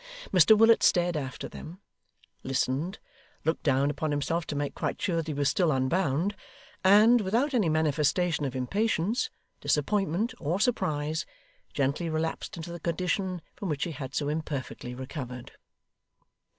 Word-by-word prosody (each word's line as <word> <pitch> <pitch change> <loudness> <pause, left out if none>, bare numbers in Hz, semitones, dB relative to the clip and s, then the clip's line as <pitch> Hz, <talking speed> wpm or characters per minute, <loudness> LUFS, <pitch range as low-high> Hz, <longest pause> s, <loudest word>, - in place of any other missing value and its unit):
Mr 185 +4 +7
Willet 225 +1 +6
stared 175 -1 +3
after 135 -4 -4
them, 175 +4 -10 0.6
listened, 135 +8 -1 0.5
looked 160 - 0
down 140 -1 +2
upon 155 +2 -2
himself 155 +3 -1
to 145 - -3
make 145 0 -2
quite - - -3
sure 175 -3 0
that 165 -1 -2
he 155 - -2
was 140 0 +1
still 175 +1 +2
unbound, 150 +7 +1 0.5
and, 215 +5 +6
without 235 +9 +1
any 215 -9 +2
manifestation 155 +2 +1
of 135 -2 -3
impatience, 210 - 0 0.3
disappointment, 195 - 0
or 165 +5 -1
surprise, 160 - 0 0.4
gently 140 +5 0
relapsed 160 +2 -3
into 165 +1 -6
the 170 - -6
condition 180 +1 -1
from 195 - -5
which 145 -2 -1
he 175 - -2
had 135 -3 -7
so 145 - 0
imperfectly 145 -5 -4
recovered. 125 -2 -7
160 Hz, 145 wpm, -28 LUFS, 145-190 Hz, 0.6 s, Mr